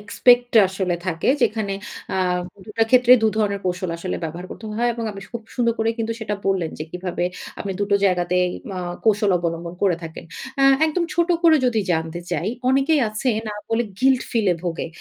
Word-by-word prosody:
Expect 245 +4 +3 0.2
আসলে 190 -2 -1
থাকে 165 +3 -1
যেখানে 210 -2 +1 0.4
এ্যাঁ 180 -1 +1 0.3
দুটা 225 +1 0
ক্ষেত্রে 250 -1 +6
দুধরনের 215 -2 +1
কৌশল 180 -1 -2
আসলে 180 +1 -3
ব্যবহার 170 +3 -6
করতে 225 - -8
হয়। 240 +1 +2
এবং 230 -1 -4
আমি 195 - -9
খুব 235 -1 -5
সুন্দর 235 -2 +2
করে 225 - +1
কিন্তু 225 0 -1
সেটা 210 -1 -2
বললেন 185 -4 +1
যে 155 - -4
কিভাবে 180 -1 -3 0.4
আপনি 195 - -3
দুটো 200 0 +1
জায়গাতেই 180 -1 +2 0.3
অ - - -3 0.3
কৌশল 210 -1 +3
অবলম্বন 170 0 -3
করে 190 -4 +3
থাকেন। 160 -1 -8 0.3
এ্যাঁ 275 0 +6
একদম 340 +2 0
ছোট 345 +1 +2
করে 325 -2 +6
যদি 230 -3 +2
জানতে 160 +1 -2
চাই, - - -1 0.2
অনেকেই 275 +4 +3
আছে 215 +5 -2 0.2
না 210 - -4 0.2
বলে 225 +1 +2 0.2
গিল্ট 260 -1 +4
ফিল্ট 225 -5 +1
এ - - -1
ভোগে। 170 -2 -2
205 Hz, 185 wpm, -22 LUFS, 180-235 Hz, 0.4 s, ক্ষেত্রে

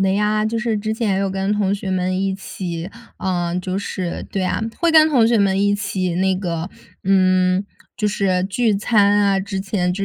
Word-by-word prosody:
的 190 0 +2
呀。 210 +1 +1
就 225 +1 -2
是 230 -2 -1
之 215 +1 -2
前 220 -3 0
也 - - 0
有 195 0 0
跟 195 +1 -1
同 205 -1 +1
学 195 -1 -5
们 185 0 0
一 195 0 0
起， 175 -3 -6 0.3
嗯， 175 -1 -1
就 185 0 -3
是 185 -3 -4
对 195 - -2
啊， 185 - -1 0.2
会 340 0 +2
跟 315 -1 +7
同 250 -7 +4
学 235 0 +3
们 195 -1 +2
一 205 0 +3
起 190 -3 -2
那 190 +2 +1
个， 175 -1 -3 0.3
嗯， 185 0 +3 0.3
就 210 - 0
是 190 -3 0
聚 215 +3 +1
餐 205 -1 +3
啊。 200 -1 +2
之 195 0 -4
前 190 -2 -1
就 195 +2 -2
195 Hz, 220 characters per minute, -20 LUFS, 185-210 Hz, 0.3 s, 跟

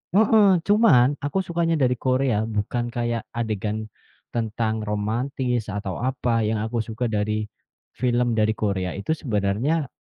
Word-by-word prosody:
heeh, 215 0 +6 0.2
cuman 200 - +6
aku 145 +6 -3
sukanya 170 -2 0
dari 125 -1 +3
Korea 130 -4 +1
bukan 110 +2 -2
kayak 120 -1 -2
adegan 110 -1 -3 0.4
tentang 110 -1 -2
romantis 115 +3 -1
atau 105 +1 -4
apa, 120 -3 0
yang 110 0 0
aku 110 +2 -2
suka 115 +1 -3
dari 105 0 -1 0.5
film 120 -2 +1
dari 110 0 +3
Korea 100 -4 -2
itu 100 +9 -4
sebenarnya, 120 +6 0
115 Hz, 130 wpm, -24 LUFS, 110-130 Hz, 0.5 s, heeh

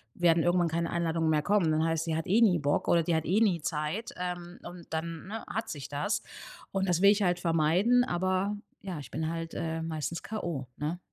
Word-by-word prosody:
werden 170 -1 +4
irgendwann 175 -1 +3
keine 170 +1 -1
Einladungen 165 -1 0
mehr 155 -1 +3
kommen. 200 -5 +3
Dann 155 +1 +2
heißt: 165 0 0
„Sie 160 -1 -1
hat 165 - -3
eh 210 +6 +4
nie 185 -7 +5
Bock, 145 0 0
oder 170 -1 +4
die 170 - 0
hat 160 - 0
eh 200 +6 +2
nie 185 -8 +3
Zeit“, 155 +9 -3
ähm, 175 0 -5
und 175 -1 -10
dann, 165 +2 -4
ne, 220 +2 -6
hat 225 +1 -3
sich 145 -1 -6
das. 150 +10 -1 0.5
Und 195 0 0
das 175 0 +2
will 200 +1 +8
ich 210 0 +1
halt 180 -1 +2
vermeiden, 175 +9 +3
aber 185 +3 0 0.2
ja, 185 -6 -5
ich 130 -4 -10
bin 160 +2 -2
halt, 165 0 -4
äh, 165 0 -3
meistens 165 +1 -3
K.O., 170 - -4
ne? 160 +4 -3
170 Hz, 220 wpm, -29 LUFS, 160-185 Hz, 0.5 s, will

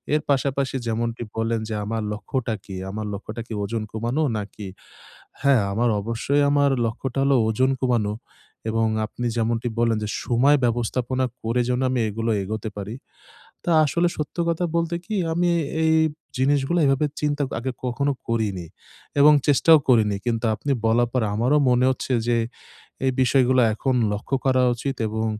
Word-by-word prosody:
এর 155 - +1
পাশাপাশি 135 -1 0
যেমনটি 115 +1 -2
বললেন 115 0 -1
যে 110 - -3
আমার 115 +1 -2
লক্ষ্যটা 115 +2 -3
কী? 95 - -8
আমার 105 +2 -4
লক্ষ্যটা 105 +3 -6
কি - - -6
ওজন 110 +2 -3
কমানো 120 +8 -1
নাকি? 105 0 -7 0.8
হ্যাঁ, 140 -6 +4 0.4
অবশ্যই 115 +7 0
আমার 145 -1 +3
লক্ষ্যটা 120 +3 -3
হলো 140 -1 +4
ওজন 130 +4 +2
কমানো 120 -5 +1 0.6
এবং 115 0 +1 0.2
আপনি 120 +2 -5
যেমনটি 115 +1 0
বললেন 115 -2 +2
যে - - -3 0.2
সময় 130 +5 +4
ব্যবস্থাপনা 120 +2 0 0.2
করে 115 +2 0
যেন 125 0 0
আমি 130 -1 0
এগুলো 115 +2 -2
এগোতে 110 +2 -4
পারি। 105 +2 -5 0.7
তো - - -7 0.2
আসলে 170 +4 +1
সত্য 150 +2 -5
কথা 170 +1 0
বলতে 170 0 0
কি 215 - -4 0.2
আমি 175 +1 +1 0.4
এই 160 - +3 0.4
জিনিসগুলো 140 +5 +1
এভাবে 135 +2 +2
চিন্তা 145 -1 0 0.2
আগে 125 +3 -3
কখনো 140 +3 0 0.2
করিনি। 105 -6 -1 0.5
এবং 150 +1 +8
চেষ্টাও 155 +2 +6
করিনি। 110 -5 +4
কিন্তু 115 -1 -1
আপনি 140 +7 -2
বলার 120 +2 +3
পর 125 -3 +1
আমারও 125 +7 +2
মনে 125 +1 +3
হচ্ছে 130 0 -3 0.2
যে 120 - +3 0.7
এই 130 - +2
বিষয়গুলো 130 0 +3
এখন 130 +4 -1 0.2
লক্ষ্য 105 +6 -3
করা 130 -1 +3
উচিত 135 +3 -4
এবং 110 +1 -2
120 Hz, 155 wpm, -23 LUFS, 110-135 Hz, 0.8 s, এবং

